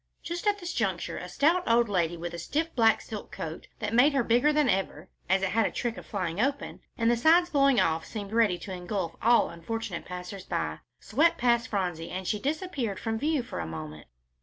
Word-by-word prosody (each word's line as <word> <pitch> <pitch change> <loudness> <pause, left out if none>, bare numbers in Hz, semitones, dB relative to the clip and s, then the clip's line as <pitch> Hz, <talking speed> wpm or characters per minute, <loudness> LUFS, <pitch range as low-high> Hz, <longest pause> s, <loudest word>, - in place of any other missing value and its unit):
Just 345 +4 -4
at 410 0 +3
this 355 -2 -5
juncture - - -1
a - - -7
stout 330 +5 +3
old 235 0 +4
lady, 175 -4 0
with 170 +1 -5
a 170 - -5
stiff 315 - -2
black 225 -2 +4
silk 215 -2 -8
coat 160 0 -6
that 215 -1 -3
made 265 +5 +5
her 270 -3 +2
bigger 245 +6 +3
than 300 -2 +3
ever, 190 -5 -1 0.2
as 190 +1 +3
it 195 - +1
had 225 +3 +2
a - - -5
trick 235 -2 -2
of - - -10
flying 185 -2 -2
open, 280 +2 -1 0.2
and 230 -1 +3
the - - +3
sides 335 +8 +4
blowing 275 -3 +4
off 160 0 +1
seemed 205 -2 -7
ready 220 -6 +3
to 190 - -7
engulf 180 -1 -3
all 235 +2 +4
unfortunate 205 +2 -5
passers 180 +1 -7
by, - - -2 0.2
swept 310 +9 +2
past 235 0 +2
Phronsie, 180 -7 -2
and 185 0 -5
she 210 - 0
disappeared 280 - -2
from 225 -1 -2
view 295 -1 0
for - - -6
a 85 - -3
moment. 75 -2 -8
225 Hz, 215 wpm, -28 LUFS, 180-275 Hz, 0.2 s, made